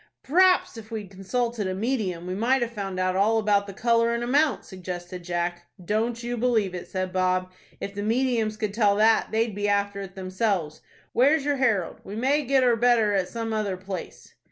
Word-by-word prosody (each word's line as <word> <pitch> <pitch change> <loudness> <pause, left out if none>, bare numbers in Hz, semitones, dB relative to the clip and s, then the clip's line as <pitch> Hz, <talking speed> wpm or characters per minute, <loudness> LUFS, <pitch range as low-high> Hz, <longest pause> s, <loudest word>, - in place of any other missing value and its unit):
"P'r'aps, 365 0 +3
if 220 -1 -10
we'd 215 -4 -6
consulted 215 +3 -2
a 185 - -2
medium, 200 -6 -2
we 180 - -3
might 240 +6 +2
have 235 - -4
found 195 -4 -4
out 185 0 +1
all 210 +4 +3
about 205 -2 +2
the - - -6
color 230 +2 +2
and 235 - -2
amount," 280 +4 +2
suggested 180 -1 -7
Jack. 175 0 -3 0.2
"Don't 230 +4 -1
you 240 0 -3
believe 225 -6 +1
it," 180 - -6
said 185 -1 -3
Bob. 185 0 +1 0.3
"If 200 - -5
the 205 - -4
mediums 225 -1 0
could 215 -2 -2
tell 205 -2 +3
that, 220 +2 +4
they'd 225 0 0
be 205 +1 -1
after 200 0 0
it 195 -1 -9
themselves. 185 -4 -2 0.3
Where's 280 +4 +3
your 290 -1 +1
'Herald'? 220 -10 0
We 200 - -8
may 275 +6 +1
get 265 0 +3
or 245 -2 +4
better 230 -3 +3
at 190 -2 0
some 225 -1 -4
other 205 -4 -1
place." 190 -1 -8
210 Hz, 200 wpm, -25 LUFS, 190-235 Hz, 0.3 s, that